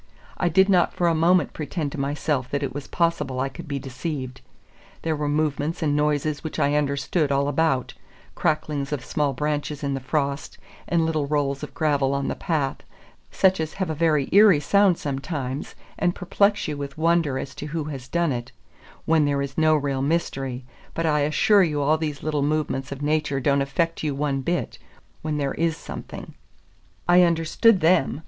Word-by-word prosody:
I 175 - +1
did 190 +4 +4
not 185 -3 +3
for 175 - +1
a 170 - +3
moment 170 +3 +3
pretend 155 -1 -3
to 150 - -6
myself 140 -1 -1
that 140 0 -2
it 135 - -3
was 145 -1 -6
possible 150 -6 0
I 135 +1 0
could 170 +4 -10
be 140 -1 -3
deceived; 130 0 -5 0.6
there 160 -1 0
were 150 -1 -2
movements 150 +2 -1
and 145 -2 +1
noises 150 +1 0
which 160 - -5
I 140 - +2
understood 145 +1 0
all 140 0 +2
about, 145 -3 0 0.4
cracklings 150 -2 -1
of 145 -4 -3
small 145 -2 0
branches 150 +1 -2
in 140 -1 -1
the 135 - -2
frost, 140 +1 -2 0.3
and 170 -1 +2
little 155 -3 -1
rolls 140 -2 0
of 150 - -8
gravel 140 -3 +1
on 140 0 -1
the - - -2
path, 150 -6 -1 0.5
such 190 -1 +3
as 160 -1 -3
have 190 -4 -2
a - - -1
very 155 -3 +2
eerie 200 -5 +7
sound 195 +4 +3
sometimes, 140 -1 -4 0.2
and 175 - +1
perplex 200 +3 +1
you 150 -1 -3
with 140 0 -6
wonder 165 -4 +2
as 135 +1 -5
to 150 - -7
who 160 +1 -3
has 135 -4 -7
done 170 -1 0
it, 120 -2 -4 0.5
when 160 -2 +3
there 140 -1 +1
is 135 -1 -6
no 155 -1 +4
real 140 -2 -1
mystery; 135 -4 -2 0.3
but 165 - -1
I 150 -2 +2
assure 155 +8 +4
you 155 -5 +1
all 150 +2 +2
these 150 -3 -4
little 150 -2 0
movements 145 -2 -1
of 140 +1 -6
nature 150 -2 0
don't 140 +1 +2
affect 165 +4 -1
you 150 -3 -1
one 140 -1 -1
bit 175 +6 -2 0.4
when 155 -1 -2
there 140 -2 -1
is 165 -1 0
something. - - -8 0.7
I 175 +1 +6
understood 175 +5 +3
them. 165 -4 +3
150 Hz, 190 wpm, -24 LUFS, 140-165 Hz, 0.7 s, eerie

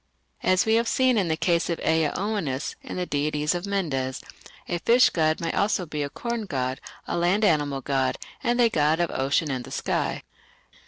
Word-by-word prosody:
As 185 -1 +3
we 220 - +2
have 230 +1 +3
seen 260 0 +3
in 195 -5 +1
the 160 -1 0
case 170 0 +1
of 170 - 0
Ea 160 -2 +2
Oannes 185 -9 -2
and - - -6
the 180 - -1
deities 150 0 0
of 175 +2 -4
Mendes, 140 -10 -1 0.5
a 175 - -2
fish 240 +7 +5
god 155 -1 +1
may 165 - -2
also 200 -3 +1
be 150 -2 -4
a 145 - -2
corn 235 +4 -4
god, 130 -3 -2 0.3
a - - -2
land 180 +5 +2
animal 145 -6 +1
god 135 -1 0 0.3
and 240 -1 +1
a 240 - +6
god 155 -5 +2
of 175 -1 0
ocean 140 +3 0
and 130 -2 -3
the - - -11
sky. - - -2
165 Hz, 200 wpm, -25 LUFS, 145-200 Hz, 0.5 s, a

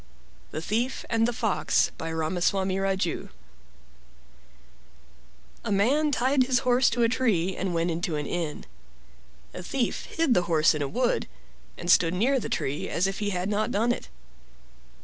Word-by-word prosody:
THE 155 - -5
THIEF 235 +7 -1
AND 225 0 +3
THE - - 0
FOX 220 -4 +1
By 165 - -5
Ramaswarni 185 +4 0
Raju 190 -3 -1 2.3
A - - -3
man 270 +10 +2
tied 265 +1 +2
his 250 -1 +2
horse 250 0 +4
to 240 0 0
a - - +5
tree 200 -8 +1
and 185 -2 -2
went 170 +1 +1
into 170 0 -2
an 150 -1 -3
inn. 165 -1 -4 0.9
A - - -6
Thief 240 +6 -2
hid 325 -6 +1
the 175 -5 +1
horse 160 -1 +4
in 150 - -3
a 140 - 0
wood, 245 - 0 0.5
and 175 0 0
stood 170 -1 +4
near 260 +8 +2
the - - -5
tree 140 +3 -2
as 175 - 0
if 195 0 -2
he 205 -1 -1
had 180 -1 -2
not 210 +1 0
done 230 +4 +1
it. - - -4
195 Hz, 165 wpm, -26 LUFS, 175-240 Hz, 2.3 s, a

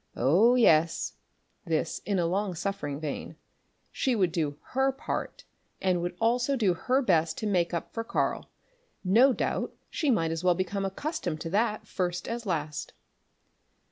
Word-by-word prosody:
Oh, 185 - +4
yes 165 -9 +3 0.5
this 160 -2 -1
in 200 -2 +1
long 185 +2 0
suffering 165 -6 -3
vein 155 -2 -5 0.6
she 260 -2 0
would 185 -5 +2
do 155 -4 -1
her 265 +1 +2
part, 270 - -5 0.4
and 180 -2 +1
would 175 0 -4
also 245 +4 +2
do 210 -8 +2
her 260 +10 +1
best 165 -6 +2
to - - -3
make 180 -5 +1
up 170 -2 -4
for 230 - -2
Karl. - - -1 0.5
No 230 +9 +5
doubt - - -2 0.2
she 305 - 0
might 165 -10 +2
as 165 +1 -3
well 180 -1 +4
become 190 +2 -2
accustomed 190 - -3
to 165 - -4
that 215 +2 +1
first 175 -2 -2
as 230 -1 -4
last. 155 -4 -3
185 Hz, 155 wpm, -28 LUFS, 165-230 Hz, 0.6 s, No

